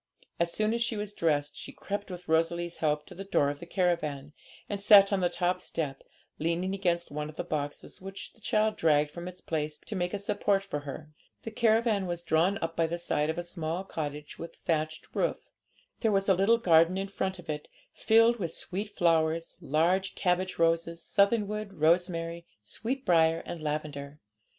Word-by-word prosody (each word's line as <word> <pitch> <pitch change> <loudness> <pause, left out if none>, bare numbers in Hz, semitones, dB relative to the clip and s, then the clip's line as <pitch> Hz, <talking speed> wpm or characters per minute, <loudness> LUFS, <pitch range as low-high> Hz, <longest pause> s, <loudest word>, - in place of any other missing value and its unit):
As 170 0 +1
soon 215 +3 +1
as 235 - -1
she 235 -2 0
was 205 0 -4
dressed, 150 -5 0
she - - -7
crept, 205 0 -5
with 180 -1 -8
Rosalie's 170 +1 +1
help, 150 -1 0
to - - -12
the 195 - -7
door 145 -7 +2
of 145 - -8
the 170 - -9
caravan, 155 -6 -1 0.3
and 205 - -3
sat 200 0 +7
on 195 - +2
the 180 -1 +2
top 180 +1 0
step, 145 -4 -3 0.4
leaning 170 +4 0
against 175 -3 0
one 150 +1 -4
of 155 - -11
the - - -3
boxes, 145 +2 -5
which 195 +1 -8
the 225 - -24
child 215 +1 +1
dragged 150 -2 +3
from 175 +2 -7
its 180 0 -8
place 150 -1 -2
to 215 - -7
make 180 -1 -1
a 205 - -2
support 200 0 0
for 170 -7 -4
her. 145 +2 -8 0.3
The 225 - -5
caravan 220 -3 +2
was 175 -1 -3
drawn 175 +4 +2
up 165 0 -3
by 165 -1 +2
the 170 +1 -3
side 155 -3 0
of 160 - -2
a 175 - -2
small 170 0 -3
cottage 150 -5 -6
with 165 - -7
a - - -29
thatched 155 -1 -1
roof. - - -1 0.5
There 225 - +2
was 195 -1 +1
a 195 - +6
little 195 +5 +4
garden 170 -3 +4
in 195 +1 -2
front 190 -1 -3
of 180 -1 -13
it, 150 -1 -4 0.3
filled 230 +1 +4
with 170 -4 -2
sweet 200 +3 -4
flowers, 165 -3 +1
large 170 +5 +1
cabbage 185 0 0
roses, 165 0 +1
southernwood, 210 0 +1
rosemary, 170 0 +1 0.2
sweetbriar, 165 - +1
and 170 - -6
lavender. 150 -1 -4
175 Hz, 195 wpm, -29 LUFS, 160-195 Hz, 0.5 s, sat